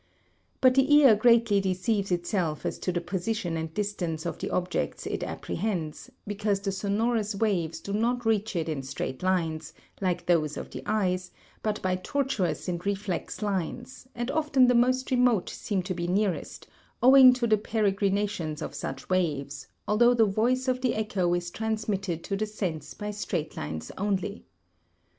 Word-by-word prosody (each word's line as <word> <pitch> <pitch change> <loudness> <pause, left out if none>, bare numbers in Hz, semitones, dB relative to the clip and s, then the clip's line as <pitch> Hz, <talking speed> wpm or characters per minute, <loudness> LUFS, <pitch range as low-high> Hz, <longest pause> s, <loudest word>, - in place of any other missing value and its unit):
But 255 -1 +6
the 270 +2 +3
ear 275 -7 +8
greatly 225 -2 +4
deceives 195 +2 0
itself 175 -3 -1
as - - -2
to 180 - -1
the 175 -1 -1
position 175 0 -2
and 160 0 -3
distance 175 -5 -3
of 170 - -4
the - - -3
objects 180 - -2
it - - -3
apprehends, 175 -6 -3 0.2
because 205 -1 -1
the 195 0 -2
sonorous 210 +2 0
waves 175 -7 0
do 200 - -6
not 240 +3 0
reach 220 -1 +1
it 165 -2 -1
in 155 -4 -2
straight 130 -1 -5
lines, 165 -4 -1 0.3
like 180 -2 -1
those 155 -4 +2
of - - -7
the - - -6
eye, 195 -4 +1 0.4
but 215 -1 -1
by 185 -1 +1
tortuous 195 - -1
and 175 -1 -3
reflex 200 0 -3
lines, 210 +7 -3
and 240 +2 -2
often 300 -4 +3
the 250 - +4
most 255 +2 +2
remote 245 -6 +3
seem 195 -3 -2
to 185 +1 -3
be 175 -1 -3
nearest, 190 0 -1 0.4
owing 260 0 +9
to 250 -1 -1
the 220 -2 +4
peregrinations 200 -6 0
of - - -5
such - - -6
waves, 150 -7 -1 0.2
although 240 +4 +4
the 225 -2 +5
voice 240 +6 +1
of 255 0 0
the 255 -2 +1
echo 200 -5 0
is 175 0 -3
transmitted 205 -6 -2
to 195 - -2
the 215 +2 -1
sense 165 -8 -4
by 210 0 -4
straight 180 -6 -3
lines 80 +1 -5
only. 200 +1 -2
200 Hz, 165 wpm, -27 LUFS, 175-225 Hz, 0.4 s, owing